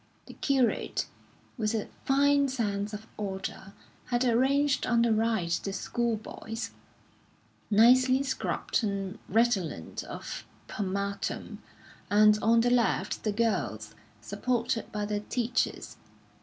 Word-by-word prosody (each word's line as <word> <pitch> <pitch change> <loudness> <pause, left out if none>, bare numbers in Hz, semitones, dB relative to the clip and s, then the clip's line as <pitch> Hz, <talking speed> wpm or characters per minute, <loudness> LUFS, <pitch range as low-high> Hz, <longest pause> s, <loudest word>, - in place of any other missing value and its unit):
The - - -11
curate, 265 -4 +1 0.5
with 215 0 0
a 215 - -2 0.2
fine 280 +1 +4
sense 210 -5 -2
of 210 +1 -7
order, 195 -1 -5 0.3
had 245 +1 0
arranged 270 +4 +2
on 235 -1 +3
the 235 -1 +3
right 220 -6 +1
the 195 - -3
school 235 +4 -1
boys, 220 +1 -6 1.0
nicely 255 +5 +5
scrubbed 260 -2 -1
and 200 0 -3
redolent 195 - 0
of - - -7 0.2
pomatum; 200 0 -3 0.5
and 210 +1 +5
on 230 +1 +4
the 245 +1 +2
left 240 -2 +1
the 215 - +1
girls, 225 +1 -1 0.3
supported 235 -2 -2
by 210 -1 -2
their 205 0 -1
teachers. 240 +3 -2
225 Hz, 115 wpm, -29 LUFS, 205-245 Hz, 1.0 s, nicely